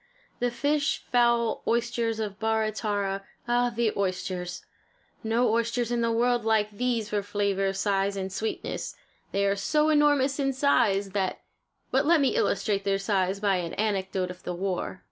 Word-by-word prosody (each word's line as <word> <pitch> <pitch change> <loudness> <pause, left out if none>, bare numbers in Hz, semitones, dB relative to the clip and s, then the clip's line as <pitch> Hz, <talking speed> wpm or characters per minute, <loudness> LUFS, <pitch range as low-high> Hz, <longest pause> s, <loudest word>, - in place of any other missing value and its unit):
The 245 - +1
fish, 285 +5 0
fowl, 235 -2 +3
oysters 235 -1 0
of 210 -2 -4
Barra 220 -1 +1
Tarra 200 -2 -2 0.2
ah, 245 0 +2
the 230 -2 0
oysters! 185 -2 -3 0.6
No 225 +1 +2
oysters 235 +1 0
in 240 -1 +1
the 230 0 +1
world 240 +1 +2
like 220 -1 +2
these 230 -1 -1
for 205 -1 0
flavor, 200 -1 0
size 195 0 0
and 190 -1 -4
sweetness. 220 +2 -4 0.4
They 200 0 +1
are 200 0 +2
so 300 +10 +1
enormous 290 -2 +3
in 275 -1 +1
size 205 -8 +2
that 190 -1 -1 0.5
but 270 +2 +2
let 335 0 +5
me 275 -2 +2
illustrate 200 0 +1
their 195 0 +1
size 195 -1 0
by 200 -2 +2
an 170 -2 -4
anecdote 190 -3 -1
of 180 - -12
the 180 - -4
war. 185 0 -3
215 Hz, 165 wpm, -27 LUFS, 195-240 Hz, 0.6 s, let